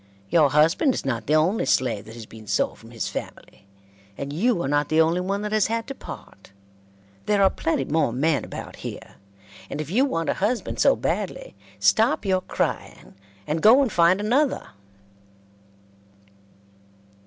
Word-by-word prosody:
Your 155 -4 +5
husband 165 - +3
is - - -5
not 115 -5 -3
the 150 - +3
only 170 +8 +2
slave 115 -6 +1
that 110 - -11
has 115 -2 -9
been 110 0 -14
sold - - -1
from - - -15
his - - -4
family, 100 - -8 0.5
and 140 +1 -5
you 210 +5 +1
are - - -2
not 145 +1 0
the 155 - +2
only 165 +2 +3
one 200 +3 -2
that 210 - -3
has 215 -2 +2
had 230 0 -2
to 275 - -6
part. 100 - -12 0.8
There 205 -1 +3
are 190 - +5
plenty 150 -4 -1
more 155 -4 +1
men 140 +1 0
about - - -8
here, - - -9 0.5
and 145 - -5
if 155 +1 -5
you 245 +7 +3
want 165 - -1
a - - +2
husband 225 +5 -2
so - - +5
badly, - - -3 0.3
stop 220 -2 +3
your 185 -1 +1
crying - - -4 0.3
and 155 +6 -2
go 245 +6 +7
and 250 - -2
find 175 +2 +4
another." 250 +7 0
170 Hz, 170 wpm, -24 LUFS, 145-215 Hz, 0.8 s, go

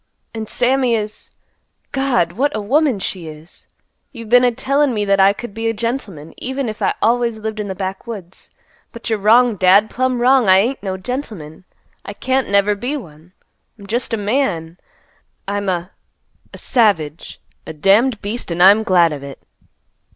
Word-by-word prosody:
And 220 -1 -6
Sammy 250 -1 +1
is—God! 215 0 -4
What 275 +10 -1
a - - -1
woman 265 +4 +1
she 185 -3 -4
is! 155 +2 -12 0.4
You've 230 -2 -10
been 245 +1 +6
a 245 - +4
tellin' 270 +2 0
me 210 -1 -1
that 195 -1 +2
I 195 +1 +6
could 205 +1 -8
be 225 +1 -3
a 225 - -2
gentleman, 205 - -4
even 265 0 -3
if 215 -1 -6
I - - +1
always 235 0 +1
lived 220 0 -5
in 210 - -3
the 190 - -5
backwoods. 190 0 -7 0.4
But 235 -1 -7
you're 220 - 0
wrong, 225 +2 +4
Dad, 190 +4 +4
plumb 255 0 -1
wrong. 250 -3 +4
I 185 - +7
ain't 240 +8 0
no 190 -2 -4
gentleman. 190 - -6 0.4
I 200 - -7
can't 260 +4 -1
never 200 +1 +3
be 245 +8 -3
one. 165 - -13 0.4
I'm 200 - -13
just 235 +4 -2
a 225 - 0
man. 200 -7 -2 0.7
I'm 200 0 -2
a—a 180 +1 -9
savage, 180 - 0 0.3
a - - -5
damned 205 - +2
beast, 215 +2 -4
and 175 +1 +1
I'm 200 +3 +7
glad 175 -6 +3
of 145 - -7
it." 140 -1 -9
215 Hz, 170 wpm, -18 LUFS, 190-245 Hz, 0.7 s, I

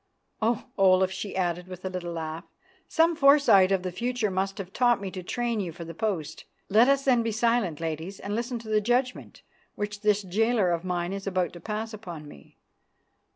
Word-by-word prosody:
Oh! 230 +1 0
Olaf," 190 -1 +5
she 200 +1 -5
added 180 -1 -1
with 185 0 -9
a - - -1
little 175 -2 -4
laugh, 160 +1 -5 0.4
"some 330 +1 +3
foresight 275 -10 +6
of 190 -2 +1
the 185 - -3
future 235 +1 -1
must 195 +1 -2
have 195 -1 -7
taught 240 -1 +3
me 195 -1 -5
to 185 - -6
train 235 +4 -2
you 180 -4 -3
for 170 +1 -9
the 165 - -8
post. 165 -6 -3 0.2
Let 220 +5 +5
us 275 0 +2
then 250 -3 +4
be 230 0 -1
silent, 220 -7 +1
ladies, 165 +4 -4
and 200 - -5
listen 240 +2 -2
to 230 -1 -11
the 215 -1 +2
judgment 250 +3 -1 0.3
which 205 0 -4
this 210 -1 +2
jailer 210 0 +1
of 170 0 -1
mine 180 0 -2
is 195 0 -6
about 185 -2 0
to 175 - -9
pass 220 +3 -4
upon 175 -8 -8
me. 70 - -15
195 Hz, 200 wpm, -27 LUFS, 180-230 Hz, 0.4 s, foresight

